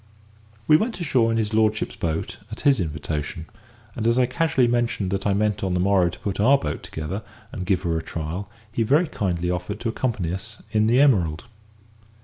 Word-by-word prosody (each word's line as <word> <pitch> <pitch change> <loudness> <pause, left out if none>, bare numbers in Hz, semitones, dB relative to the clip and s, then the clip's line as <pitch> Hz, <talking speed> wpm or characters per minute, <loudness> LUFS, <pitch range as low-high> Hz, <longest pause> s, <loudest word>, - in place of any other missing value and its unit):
We 155 - +7
went 220 +5 -2
ashore 130 -9 +2
in 115 - +1
his 110 -1 -1
lordship's 110 0 +1
boat 80 -1 -3
at 110 - -7
his 140 -4 +4
invitation; 75 0 -3 0.5
and 115 -1 -1
as 115 +1 +3
I 130 - +5
casually 160 -3 +2
mentioned 120 -5 0
that 100 +1 -1
I 100 - +2
meant 105 0 0
on 95 -2 0
the - - +1
morrow 95 -1 +3
to 85 - -9
put 100 -2 -4
our 130 +7 +6
"boat" 75 - -4
together 80 +7 -5 0.3
and 90 -2 -5
give 95 -1 +1
her 85 -2 0
a - - -7
trial, 85 +5 -5 0.2
he 115 - -1
very 145 +10 +3
kindly 90 - -1
offered 90 +4 -3
to 115 - -1
accompany 110 -8 -1
us 95 0 -7
in 110 0 +3
the 120 +3 +4
Emerald. 90 - +3
105 Hz, 200 wpm, -24 LUFS, 90-120 Hz, 0.5 s, We